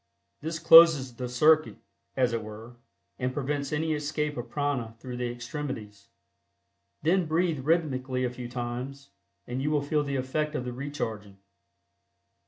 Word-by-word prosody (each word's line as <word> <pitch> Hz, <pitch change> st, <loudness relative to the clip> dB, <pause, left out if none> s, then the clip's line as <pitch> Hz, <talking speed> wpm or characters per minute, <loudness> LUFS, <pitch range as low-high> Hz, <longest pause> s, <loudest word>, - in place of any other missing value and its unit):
This 160 Hz, +2 st, -3 dB
closes 165 Hz, -5 st, +8 dB
the 125 Hz, +1 st, -5 dB
circuit, 155 Hz, +5 st, +4 dB, 0.4 s
as 125 Hz, -2 st, +2 dB
it 115 Hz, -, -1 dB
were, 110 Hz, +3 st, -10 dB, 0.4 s
and 125 Hz, 0 st, -1 dB
prevents 140 Hz, 0 st, -2 dB
any 160 Hz, +1 st, 0 dB
escape 150 Hz, 0 st, -2 dB
of 120 Hz, -, -6 dB
prana 140 Hz, -6 st, -2 dB
through 125 Hz, +1 st, -7 dB
the 125 Hz, -1 st, -2 dB
extremities. 120 Hz, -5 st, -6 dB, 1.0 s
Then 175 Hz, +2 st, +2 dB
breathe 165 Hz, -1 st, +1 dB
rhythmically 130 Hz, -4 st, 0 dB
a 125 Hz, -, 0 dB
few 125 Hz, -1 st, -7 dB
times, 125 Hz, +2 st, -5 dB, 0.3 s
and 125 Hz, +2 st, -4 dB
you 145 Hz, -, 0 dB
will 150 Hz, -2 st, +1 dB
feel 150 Hz, +1 st, +1 dB
the 140 Hz, -1 st, -3 dB
effect 150 Hz, +4 st, -1 dB
of 125 Hz, -, -2 dB
the 125 Hz, -, -4 dB
recharging. 110 Hz, -7 st, -5 dB
135 Hz, 150 wpm, -28 LUFS, 125-150 Hz, 1.0 s, closes